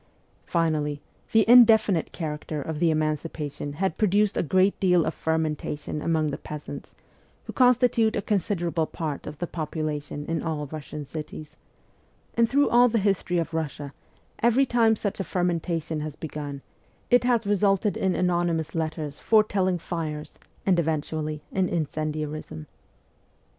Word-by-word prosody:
Finally, 155 -4 0 0.3
the 220 -1 +4
indefinite 220 -7 +6
character 155 -2 -4
of 150 +2 -4
the 170 0 +3
emancipa 155 -1 -1
tion 145 +1 -6
had 180 +2 -2
produced 205 0 +3
a - - +1
great 185 +5 +2
deal 180 -3 +3
of - - -1
fermentation 155 -2 -2
among 155 -2 +1
the - - -5
peasants, 150 -1 -8 0.5
who - - -8
constitute 245 -3 +4
a - - 0
considerable 175 -5 0
part 155 -4 -5
of 150 - -7
the 175 - -2
population 155 -3 -4
in 165 0 -2
all 155 -3 -3
Russian 150 0 -7
cities; 155 0 -8 0.8
and 230 -1 +3
through 285 +1 +3
all 245 +1 +6
the 230 - +1
history 195 -3 +1
of 165 -1 -2
Russia, 145 -3 -4 0.5
every 240 +4 +4
time 230 -3 +3
such 205 -2 -3
a - - 0
fermentation 170 -3 -1
has 150 -1 -5
begun 145 -3 -6 0.5
it 245 -1 +5
has 240 -3 +2
resulted 200 0 +2
in 190 -2 0
anonymous 175 -3 0
letters 155 -3 -3
foretelling 200 -4 +2
fires, 155 -3 -5 0.3
and 185 -3 +3
eventually 155 -1 -2
in 190 -2 0
incendiarism. 155 - -3
165 Hz, 140 wpm, -26 LUFS, 150-195 Hz, 0.8 s, indefinite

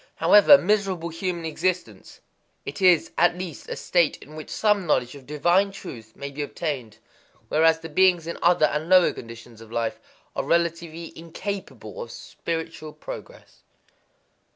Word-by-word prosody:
However 210 +7 +7
miserable 190 -4 0
human 170 0 -3
existence, 180 +3 -3 0.4
it - - -6
is 180 -4 +4
at 175 +1 +4
least 180 -5 -7
a - - -3
state 170 -4 +1
in 150 +3 -14
which 155 - -8
some 210 -4 +1
knowledge 125 -4 +1
of 140 -3 -13
divine 175 +7 +2
truth 115 - -10
may 140 0 -6
be 145 +2 -5
obtained; 140 -7 -4 0.5
whereas 160 +1 +3
the 165 - -6
beings 175 +1 +3
in 170 - -5
other 170 -2 +4
and 150 +2 -2
lower 185 -2 +6
conditions 115 -1 -11
of 115 -1 -13
life 115 -1 -2 0.4
are - - -1
relatively 170 -1 -1
incapable 200 - -7
of 485 - -7
spiritual 165 -2 -6
progress. - - -10
165 Hz, 150 wpm, -24 LUFS, 150-185 Hz, 0.5 s, However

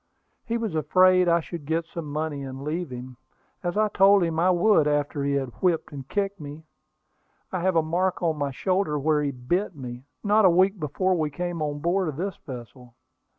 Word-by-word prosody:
He 230 0 -2
was 225 -6 -3
afraid 185 +4 +4
I 170 0 +3
should 165 -1 -7
get 165 +1 0
some 165 -3 -7
money 150 -1 -3
and 135 0 -7
leave 160 +2 -3
him, 125 0 -8 0.4
as 175 0 -2
I 215 0 +3
told 195 -1 +5
him 165 -1 -1
I 180 +2 +4
would 180 -3 +4
after 145 -1 0
he 140 0 0
had 135 -2 -1
whipped 175 -4 +1
and 135 -2 -8
kicked 200 -1 -1
me. 150 +1 -9 0.9
I 185 - -2
have 185 +1 +1
a 165 - +4
mark 180 +3 -1
on 165 -2 +1
my 145 -1 -2
shoulder 185 +3 0
where 150 +1 +1
he 145 - 0
bit 165 +9 -2
me, 125 -2 -8 0.2
not 210 +1 +4
a 190 - +7
week 190 +3 +3
before 185 +5 0
we 155 -4 0
came 175 +2 -4
on 145 -1 -2
board 180 +3 +1
of 155 - -3
this 190 +1 -3
vessel." 125 -1 -10
165 Hz, 205 wpm, -25 LUFS, 145-185 Hz, 0.9 s, a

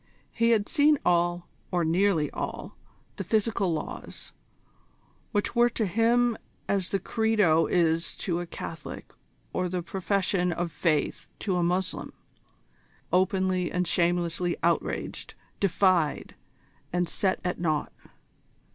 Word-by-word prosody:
He 230 0 +2
had 215 -3 +3
seen 295 +1 +4
all, 175 0 +2 0.2
or 175 -2 +1
nearly 170 -2 +2
all, - - -5 0.4
the - - -3
physical 215 -4 +1
laws, 160 - -5 1.0
which 205 +2 -1
were 240 0 +5
to 225 -2 -1
him 230 +4 +2 0.3
as 195 -3 0
the 195 - +1
Credo 210 -7 +2
is 165 -1 +1
to 175 -4 -1
a 175 - -5
Catholic 165 -2 -8 0.4
or 185 -1 0
the 180 -1 -2
Profession 185 0 0
of 170 0 -2
Faith 155 -2 0
to 190 -4 0
a 180 - +1
Moslem, 180 +2 -1 1.0
openly 185 -1 +2
and 180 0 0
shamelessly 175 0 +1
outraged, 170 0 -1 0.2
defied, 185 -4 +2 0.6
and 180 0 0
set 190 +2 0
at 180 - -2
nought. 155 -4 -1
180 Hz, 120 wpm, -27 LUFS, 170-200 Hz, 1.0 s, were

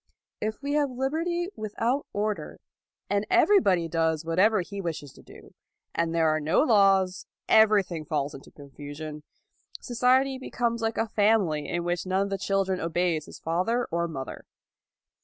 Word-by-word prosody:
If 215 +5 -3
we 285 +1 -2
have 295 -2 +2
liberty 325 +8 -2
without 230 +6 -2
order, 210 0 -3 0.5
and 205 0 0
everybody 345 - +4
does 160 -1 0
whatever 190 +6 +3
he 200 +3 -6
wishes 155 -6 -5
to - - -16
do, - - -16 0.4
and 170 -1 0
there 165 -1 +3
are 155 0 +2
no 155 - +2
laws, 195 -6 +3 0.2
everything 205 -7 +4
falls 145 -1 -2
into 135 - -12
confusion: 145 +2 -9 0.6
society 260 +2 +2
becomes 235 -2 -2
like 225 0 -1
a 225 - 0
family 205 -9 +1
in 175 0 -2
which 175 +1 -2
none 190 +1 +1
of 200 - -4
the 195 - -2
children 190 -1 0
obeys 165 -2 -1
his - - -10
father 185 +9 0
or 170 +1 0
mother. 135 -5 -7
195 Hz, 155 wpm, -27 LUFS, 165-230 Hz, 0.6 s, everybody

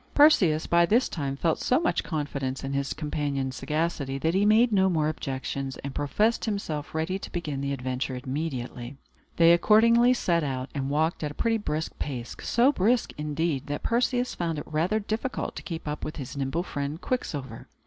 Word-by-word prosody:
Perseus, 185 - +5
by 170 0 +4
this 235 +7 +3
time, 140 -4 -3
felt 160 +3 0
so 255 - +2
much 330 - 0
confidence 140 -5 -3
in 135 0 -3
his 140 0 -1
companion's 145 -3 -2
sagacity, 150 -3 -2
that 160 +4 0
he 200 +2 +3
made 225 +3 +5
no 190 -2 +4
more 155 -4 +1
objections, 135 -2 -4
and 140 -1 -5
professed 210 - +1
himself 165 -10 -3
ready 170 +5 -1
to - - -8
begin 150 -6 -3
the 140 0 -2
adventure 130 -1 -3
immediately. 130 -3 -4 0.4
They 170 0 +7
accordingly 230 +7 +5
set 170 -8 +1
out, 130 -2 -3
and 135 -1 -2
walked 155 +3 0
at 150 - -1
a 145 - -10
pretty 225 -1 +1
brisk 160 -5 -3
pace; 125 -5 -4
so 245 +4 +3
brisk, 235 0 +1
indeed, 150 -1 -2
that 145 0 -4
Perseus 245 +1 +1
found 165 -2 -2
it 150 - -5
rather 170 +8 0
difficult 220 +5 -3
to - - -5
keep 165 -3 -6
up 150 0 -4
with 155 - -4
his 140 -2 -7
nimble 140 +5 -1
friend 145 -1 -4
Quicksilver. 140 - -4
155 Hz, 185 wpm, -27 LUFS, 140-195 Hz, 0.4 s, They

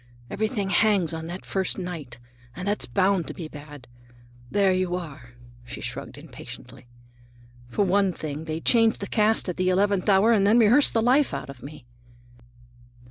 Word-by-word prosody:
Everything 215 -2 -2
hangs 200 -7 +2
on 160 0 -5
that 175 +2 -7
first 190 -1 -2
night, 165 -10 -6 0.4
and 185 +2 -6
that's 205 +1 0
bound 190 -3 +1
to - - -7
be 165 - -6
bad. 145 -3 -12 0.6
There 195 +4 +2
you 185 -1 -1
are," 140 -8 -9 0.3
she 120 - -8
shrugged - - -6
impatiently. 125 - -12 0.8
"For 195 - 0
one 195 +1 +2
thing, 155 -2 -6
they 160 0 -4
change 225 +1 +3
the 200 - -5
cast 215 +1 +1
at 180 - -4
the 185 0 +1
eleventh 200 +1 +1
hour 200 +4 +5
and 200 -3 +3
then 220 +3 +5
rehearse 240 +5 +5
the 225 - +1
life 255 - +3
out 140 0 -6
of 130 -3 -15
me." 140 -1 -11
185 Hz, 170 wpm, -25 LUFS, 160-205 Hz, 0.8 s, hour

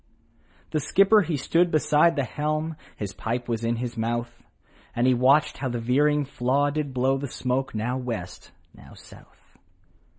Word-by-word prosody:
The 155 - 0
skipper 195 +8 +4
he 165 -5 -2
stood 170 +6 +2
beside 155 +1 +3
the 140 - 0
helm, 155 +5 -2 0.2
His 100 -3 -5
pipe 115 +6 -4
was 115 -1 -2
in 115 +1 0
his 120 0 -4
mouth, 120 +1 -3 0.5
And 120 - +1
he 130 - +5
watched 135 +5 +3
how 130 - -2
the 120 - -3
veering 145 +5 +2
flaw 140 +2 0
did 145 -1 -3
blow 130 +1 +1
The 140 - -4
smoke 130 0 -2
now 120 +4 -2
West, 115 -8 -6 0.2
now - - -15
South. - - -18
130 Hz, 165 wpm, -25 LUFS, 120-150 Hz, 0.5 s, he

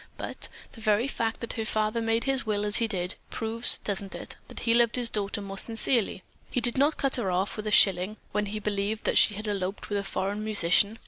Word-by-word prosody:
But, - - -4 0.2
the 225 - -13
very 215 +4 +2
fact 230 -4 -2
that 235 - -4
the 225 - -3
father 215 +1 0
made 225 0 +1
his 270 -1 0
will 210 -1 -1
as 205 0 +3
he 230 - +2
did, 180 -3 -3 0.2
proves, 225 +2 +2
doesn't 200 -1 -3
it, - - -4
that - - -7
he 230 - +2
loved 235 -1 +4
his 245 -3 +3
daughter 205 -1 -2
more 195 0 -5
sincerely? 225 -3 0 0.3
He - - 0
did 240 0 0
not 285 +3 +3
cut 275 -1 0
her 230 -6 -1
off 190 +2 0
with 215 0 -5
a - - -1
shilling 195 +1 +4
when 210 0 -1
he 210 +2 -4
believed 210 +1 -2
that - - +3
she 210 - +5
had 215 +2 -6
eloped 195 -1 -3
with 205 - +1
a - - -3
foreign 200 +2 -3
musician. 205 +1 +3
215 Hz, 235 wpm, -27 LUFS, 200-230 Hz, 0.3 s, she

